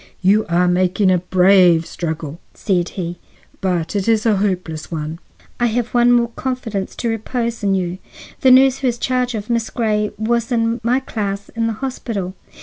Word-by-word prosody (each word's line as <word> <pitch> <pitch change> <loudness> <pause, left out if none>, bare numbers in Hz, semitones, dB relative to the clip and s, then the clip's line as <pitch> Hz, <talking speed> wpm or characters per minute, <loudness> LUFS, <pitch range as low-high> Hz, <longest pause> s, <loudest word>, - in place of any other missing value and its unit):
"You 205 +3 +3
are 175 +1 +3
making 185 +2 +2
a 180 - +3
brave 180 -2 +4
struggle," 160 -2 -5 0.2
said 180 -4 0
he, 175 -1 -4 0.4
"but 180 -2 -1
it 200 0 -1
is 225 -1 +2
a 215 -3 +3
hopeless 180 -6 -2
one." 160 0 -4 0.4
"I 240 - +3
have 240 +1 -1
one 240 0 +4
more 240 -1 +3
confidence 235 -6 -4
to 235 - -3
repose 230 +1 -2
in 200 -2 +1
you. 180 -1 -2 0.4
The 265 - +4
nurse 265 +1 +6
who 270 - 0
has 240 -1 0
charge 250 -1 -1
of 210 -1 -5
Miss 235 -2 -1
Grey 210 -3 0
was 235 +2 -1
in 230 0 0
my 245 +4 +1
class 200 -5 -4
in 230 -1 -2
the 225 - -1
hospital. 210 -8 -4
210 Hz, 180 wpm, -19 LUFS, 180-235 Hz, 0.4 s, nurse